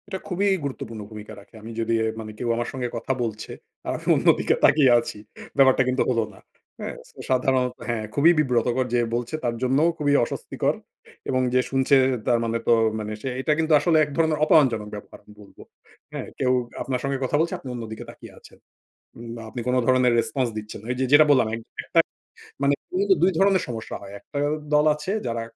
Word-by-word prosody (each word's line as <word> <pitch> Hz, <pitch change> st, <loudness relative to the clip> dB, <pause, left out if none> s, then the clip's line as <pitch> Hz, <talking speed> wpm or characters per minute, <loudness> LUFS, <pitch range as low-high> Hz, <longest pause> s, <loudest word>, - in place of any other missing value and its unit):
এটা 190 Hz, -1 st, -5 dB
খুবই 195 Hz, +2 st, 0 dB, 0.2 s
গুরুত্বপূর্ণ 115 Hz, -5 st, -5 dB
ভূমিকা 105 Hz, -1 st, -9 dB
রাখে। 100 Hz, +2 st, -18 dB
আমি 115 Hz, +2 st, -9 dB
যদি 115 Hz, 0 st, 0 dB
এ -, -, +1 dB
মানে 110 Hz, -1 st, -7 dB
কেউ 120 Hz, -, -3 dB
আমার 120 Hz, 0 st, -2 dB
সঙ্গে 130 Hz, -2 st, -3 dB
কথা 115 Hz, +3 st, -3 dB
বলছে, 110 Hz, -2 st, -5 dB, 0.4 s
আমি -, -, -5 dB, 0.2 s
অন্য -, -, -1 dB
দিকে -, -, +2 dB
তাকিয়ে 140 Hz, -4 st, +5 dB
আছি। 115 Hz, -, -6 dB, 0.4 s
ব্যাপারটা 130 Hz, -1 st, +5 dB
কিন্তু 130 Hz, +1 st, 0 dB
হল 120 Hz, -2 st, +1 dB
না। 95 Hz, -, -16 dB, 0.4 s
হ্যাঁ? -, -, -5 dB
সো -, -, -26 dB
সাধারণত 130 Hz, -1 st, +1 dB, 0.2 s
হ্যাঁ, 110 Hz, -2 st, -2 dB
খুবই 155 Hz, +4 st, +5 dB
বিব্রতকর। 125 Hz, -2 st, +1 dB
যে 120 Hz, -, +3 dB, 0.2 s
বলছে, 120 Hz, +4 st, -3 dB
তার 120 Hz, -1 st, -1 dB
জন্যও 135 Hz, +6 st, +3 dB
খুবই 145 Hz, -2 st, +1 dB
অস্বস্তিকর। -, -, -2 dB, 0.5 s
এবং 130 Hz, -1 st, +1 dB
যে 130 Hz, -, +4 dB
শুনছে, 135 Hz, +1 st, +3 dB, 0.3 s
তার 120 Hz, -2 st, +3 dB
মানে 115 Hz, 0 st, -1 dB
তো -, -, +6 dB, 0.3 s
মানে 105 Hz, 0 st, -5 dB
সে 135 Hz, -, -3 dB
এটা 150 Hz, -, +2 dB
কিন্তু 160 Hz, 0 st, +2 dB
আসলে 165 Hz, 0 st, +2 dB
এক 150 Hz, -, -2 dB
ধরনের 160 Hz, -2 st, +2 dB
অপমানজনক 120 Hz, -10 st, +3 dB
ব্যপার, 105 Hz, -, -10 dB
আমি 105 Hz, -, -18 dB
বলবো। 100 Hz, -, -16 dB, 0.5 s
হ্যাঁ? -, -, -5 dB
কেউ 130 Hz, -2 st, +2 dB, 0.3 s
আপনার 130 Hz, -2 st, -2 dB
সঙ্গে 140 Hz, 0 st, -1 dB
কথা 130 Hz, -, -1 dB
বলছে, 165 Hz, +1 st, 0 dB
আপনি 130 Hz, -, -9 dB
অন্যদিকে 115 Hz, -2 st, -7 dB
তাকিয়ে -, -, -12 dB
আছেন। -, -, -17 dB, 0.6 s
ওম 120 Hz, 0 st, -9 dB
বা 115 Hz, -, -8 dB
আপনি 125 Hz, -, -5 dB
কোন 125 Hz, -, +2 dB
ধরনের 130 Hz, -1 st, +4 dB
রেসপন্স 130 Hz, +2 st, 0 dB
দিচ্ছেন 105 Hz, 0 st, -8 dB
না। -, -, -12 dB
এই -, -, -4 dB
যে -, -, +2 dB
যেটা 150 Hz, +1 st, +8 dB
বললাম, 130 Hz, -5 st, +5 dB
একটা 115 Hz, -, -1 dB, 0.6 s
মানে 140 Hz, +1 st, +3 dB, 0.2 s
মূলত 390 Hz, +3 st, -1 dB
২ 185 Hz, -, +5 dB
ধরনের 195 Hz, -1 st, +3 dB
সমস্যা 115 Hz, -2 st, -5 dB
হয়। 100 Hz, 0 st, -10 dB
একটা 145 Hz, -, -7 dB, 0.4 s
দল 150 Hz, 0 st, +5 dB
আছে 150 Hz, +6 st, -4 dB
যারা 115 Hz, -1 st, -2 dB
130 Hz, 200 wpm, -24 LUFS, 115-145 Hz, 0.6 s, যেটা